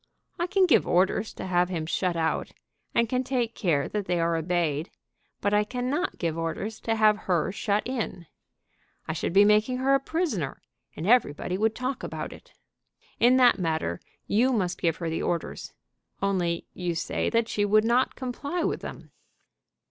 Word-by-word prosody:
I 345 Hz, -, 0 dB
can 380 Hz, +1 st, +3 dB
give 355 Hz, -, +4 dB
orders 190 Hz, +4 st, +2 dB
to -, -, -6 dB
have 180 Hz, -1 st, +2 dB
him 165 Hz, -4 st, -3 dB
shut 180 Hz, +2 st, -1 dB
out, 160 Hz, -1 st, -1 dB, 0.4 s
and 235 Hz, 0 st, +3 dB
can 255 Hz, +2 st, 0 dB
take 245 Hz, -3 st, -1 dB
care 155 Hz, -10 st, 0 dB
that 210 Hz, -2 st, -2 dB
they 175 Hz, -1 st, +1 dB
are 165 Hz, 0 st, +1 dB
obeyed; 165 Hz, -2 st, -1 dB, 0.5 s
but 205 Hz, +1 st, +1 dB
I 210 Hz, 0 st, +4 dB
cannot 255 Hz, -, -2 dB
give 165 Hz, -3 st, -1 dB
orders 165 Hz, +7 st, -3 dB
to 225 Hz, -, -1 dB
have 215 Hz, -1 st, +5 dB
her 175 Hz, 0 st, +2 dB
shut 205 Hz, +1 st, -1 dB
in. 235 Hz, -8 st, -4 dB, 0.8 s
I 155 Hz, -, -1 dB
should 160 Hz, -, -2 dB
be 200 Hz, +3 st, +6 dB
making 215 Hz, +4 st, +3 dB
her 265 Hz, +2 st, +2 dB
a 275 Hz, -, +5 dB
prisoner, 270 Hz, -, -2 dB, 0.4 s
and 160 Hz, -, -5 dB
everybody 185 Hz, -6 st, +2 dB
would 220 Hz, +3 st, +1 dB
talk 255 Hz, +1 st, -3 dB
about -, -, -5 dB
it. -, -, -16 dB, 0.7 s
In 250 Hz, +2 st, +5 dB
that 245 Hz, -4 st, +5 dB
matter 160 Hz, -, -1 dB, 0.3 s
you 240 Hz, +6 st, +2 dB
must 185 Hz, -7 st, -1 dB
give 165 Hz, -2 st, +2 dB
her 170 Hz, -, -4 dB
the 160 Hz, -, -2 dB
orders; 170 Hz, -, -3 dB, 0.5 s
only 180 Hz, -4 st, 0 dB
you 175 Hz, -2 st, -3 dB
say 165 Hz, -, -1 dB
that 230 Hz, -1 st, +1 dB
she 205 Hz, -, 0 dB
would 215 Hz, +2 st, +4 dB
not 245 Hz, +3 st, +2 dB
comply 280 Hz, +6 st, -3 dB
with -, -, -1 dB
them." -, -, -9 dB
205 Hz, 180 wpm, -27 LUFS, 170-245 Hz, 0.8 s, be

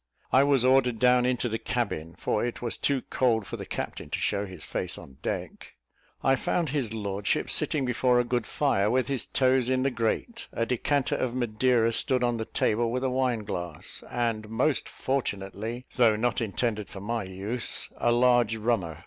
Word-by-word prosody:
I 130 Hz, -, +6 dB
was 140 Hz, -3 st, +3 dB
ordered 130 Hz, -2 st, +4 dB
down 125 Hz, +1 st, +4 dB
into 125 Hz, -1 st, 0 dB
the 115 Hz, -1 st, -2 dB
cabin, 85 Hz, -9 st, -3 dB
for 105 Hz, -, -1 dB
it 120 Hz, 0 st, -3 dB
was 120 Hz, -2 st, -1 dB
too 140 Hz, -3 st, 0 dB
cold 115 Hz, -5 st, +2 dB
for -, -, -6 dB
the -, -, -7 dB
captain -, -, -5 dB
to -, -, -2 dB
show 100 Hz, +1 st, -1 dB
his 90 Hz, -4 st, -10 dB
face -, -, -2 dB
on 65 Hz, -1 st, -13 dB
deck. -, -, -5 dB, 0.5 s
I 135 Hz, -, +4 dB
found 160 Hz, +4 st, -1 dB
his 130 Hz, -6 st, -1 dB
lordship 100 Hz, -2 st, -1 dB
sitting 145 Hz, -4 st, +2 dB
before 125 Hz, 0 st, +2 dB
a -, -, +3 dB
good 120 Hz, -2 st, -1 dB
fire, 105 Hz, -9 st, +1 dB
with 130 Hz, +3 st, +1 dB
his 135 Hz, -3 st, -1 dB
toes 130 Hz, -2 st, +2 dB
in 130 Hz, 0 st, +1 dB
the 135 Hz, -, +1 dB
grate; 120 Hz, -, -2 dB
a 115 Hz, -, -1 dB
decanter 130 Hz, +3 st, 0 dB
of 125 Hz, -1 st, -2 dB
Madeira 120 Hz, -1 st, +2 dB
stood 130 Hz, +2 st, +1 dB
on 120 Hz, -1 st, +1 dB
the 110 Hz, -, -3 dB
table, 115 Hz, +2 st, 0 dB
with 125 Hz, +2 st, -2 dB
a 130 Hz, -, +1 dB
wine 125 Hz, -4 st, 0 dB
glass, 85 Hz, -6 st, -5 dB
and 115 Hz, -3 st, -2 dB
most 130 Hz, +6 st, +1 dB
fortunately, 115 Hz, -2 st, -3 dB
though 115 Hz, -4 st, +5 dB
not 120 Hz, +3 st, 0 dB
intended 110 Hz, -1 st, -2 dB
for 100 Hz, -, -8 dB
my 115 Hz, +3 st, -2 dB
use, 100 Hz, +6 st, 0 dB
a 120 Hz, -, +2 dB
large 120 Hz, -2 st, +4 dB
rummer. 105 Hz, -8 st, -1 dB
120 Hz, 190 wpm, -27 LUFS, 110-130 Hz, 0.5 s, I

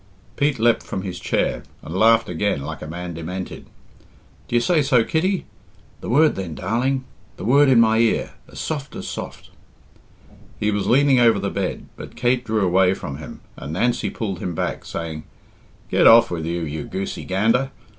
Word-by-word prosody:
Pete 145 Hz, -1 st, +1 dB
leapt 115 Hz, 0 st, +3 dB
from 95 Hz, -, -5 dB
his 90 Hz, -2 st, -5 dB
chair -, -, -1 dB, 0.2 s
and 80 Hz, -, -7 dB
laughed 115 Hz, +3 st, +4 dB
again 90 Hz, -4 st, -1 dB
like 75 Hz, 0 st, -6 dB
a -, -, -6 dB
man 85 Hz, +2 st, -6 dB
demented. 90 Hz, +3 st, -6 dB, 0.8 s
"D'ye 120 Hz, -, +1 dB
say 160 Hz, +6 st, +2 dB
so, 135 Hz, -5 st, +3 dB
Kitty? 180 Hz, -, 0 dB, 0.5 s
The -, -, -7 dB
word 150 Hz, +6 st, +4 dB
then, 90 Hz, -5 st, -5 dB
darling 130 Hz, +7 st, -1 dB, 0.3 s
the 90 Hz, -, -6 dB
word 140 Hz, +4 st, +5 dB
in 125 Hz, -3 st, +6 dB
my 110 Hz, -1 st, +4 dB
ear 115 Hz, -1 st, +1 dB, 0.2 s
as -, -, -9 dB
soft 145 Hz, -3 st, -4 dB
as -, -, -6 dB
soft -, -, -7 dB, 0.6 s
" -, -, -25 dB
He 105 Hz, 0 st, +1 dB
was 105 Hz, -1 st, -1 dB
leaning 135 Hz, 0 st, +4 dB
over 115 Hz, -3 st, +5 dB
the 100 Hz, 0 st, -2 dB
bed, 95 Hz, -2 st, -3 dB
but -, -, -10 dB
Kate 120 Hz, +1 st, +1 dB
drew 110 Hz, -3 st, 0 dB
away 95 Hz, +1 st, +3 dB
from 70 Hz, -6 st, -6 dB
him, 80 Hz, -, -10 dB
and 75 Hz, +2 st, -7 dB
Nancy 120 Hz, +8 st, 0 dB
pulled 100 Hz, -5 st, -4 dB
him 90 Hz, -3 st, -4 dB
back, -, -, -3 dB
saying, 80 Hz, -2 st, -5 dB, 0.7 s
"Get -, -, +5 dB
off 115 Hz, -3 st, +7 dB
with 80 Hz, -2 st, -3 dB
you, 85 Hz, +1 st, -2 dB
you 75 Hz, -1 st, -4 dB
goosey 95 Hz, +1 st, -5 dB
gander! 115 Hz, +8 st, +1 dB
105 Hz, 185 wpm, -22 LUFS, 90-125 Hz, 0.8 s, off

